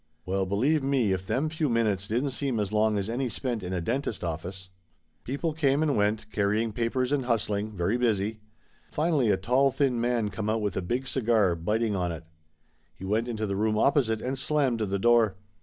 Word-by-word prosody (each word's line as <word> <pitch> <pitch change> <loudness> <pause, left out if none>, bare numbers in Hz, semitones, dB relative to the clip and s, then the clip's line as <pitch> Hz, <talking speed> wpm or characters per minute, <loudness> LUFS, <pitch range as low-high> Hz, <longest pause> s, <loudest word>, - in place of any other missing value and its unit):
Well, 95 +1 -1
believe 135 +11 +2
me, 135 -6 +1
if 95 0 -4
them 130 +9 0
few 155 -1 -1
minutes 105 -4 +1
didn't 125 +6 0
seem 130 -3 -2
as 105 -1 -2
long 110 0 +2
as 100 0 -2
any 125 +3 -1
spent 120 -1 -2
in 90 0 -5
a 90 - -1
dentist 115 +1 -2
office! 90 +3 -5 0.5
People 145 +5 -2
came 145 -1 +2
and 150 -3 +1
went, 105 +1 +1
carrying 105 +2 +1
papers 125 +3 -1
and 140 -3 0
hustling, 105 -3 -1
very 90 +7 +1
busy. 110 -3 0 0.5
Finally 150 -6 +1
a 100 - +3
tall 125 +8 +3
thin 130 -3 0
man 120 -3 +1
come 105 +1 -3
out 110 +1 +1
with 100 -3 -1
a 95 - -1
big 120 +9 -2
cigar, 115 -8 +2
biting 105 +6 -1
on 90 -2 -1
it. 80 -1 -7 0.7
He 95 - -9
went 110 +4 0
into 110 -2 -2
the 100 -1 -2
room 110 +1 +1
opposite 115 -4 +2
and 130 +1 -3
slammed 135 -4 +1
the 100 -2 -1
door. 115 -1 +4
110 Hz, 200 wpm, -27 LUFS, 100-130 Hz, 0.7 s, door